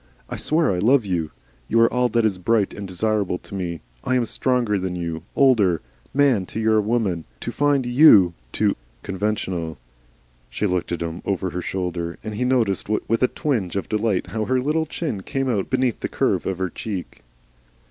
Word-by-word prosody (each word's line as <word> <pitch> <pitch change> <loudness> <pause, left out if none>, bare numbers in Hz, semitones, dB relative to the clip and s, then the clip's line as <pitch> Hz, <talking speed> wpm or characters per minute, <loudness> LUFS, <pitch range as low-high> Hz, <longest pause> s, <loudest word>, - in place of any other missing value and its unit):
I - - -2
swear 155 -3 +2
I 90 - -1
love 120 +4 +4
you. 85 -5 -1 0.4
You 115 - +2
are 115 - +4
all 125 0 +2
that 115 0 +2
is 100 -4 0
bright 105 +2 +1
and 100 -1 -6
desirable 100 0 0
to - - -14
me. 85 -5 -3 0.2
I 130 - +1
am 125 -2 +2
stronger 120 -4 0
than 90 -1 -3
you, 85 -2 -4
older; 105 - +4 0.3
man 135 -10 +3
to - - -5
your 110 -1 +3
woman. 105 -7 0 0.2
To - - -3
find 145 -3 +2
YOU 120 - +7 0.2
too - - +1 0.3
conventional!" 95 -5 -2 0.7
She - - -2
looked 90 -3 -1
at 85 -1 -2
him 85 +1 -5
over 95 -2 -1
her 90 - -3
shoulder, 85 -2 -3
and 110 0 -5
he 120 +4 -1
noticed 115 -7 +1
with 110 +1 0
a 125 - +5
twinge 115 - -2
of 100 - -2
delight 105 -3 0
how 110 -1 -2
her 130 +2 +1
little 155 +4 0
chin 145 - -3
came 135 +6 -2
out 105 -6 0
beneath 130 -3 +1
the - - -3
curve - - 0
of 95 - -1
her 95 -1 -2
cheek. 100 -5 -6
105 Hz, 190 wpm, -23 LUFS, 90-125 Hz, 0.7 s, YOU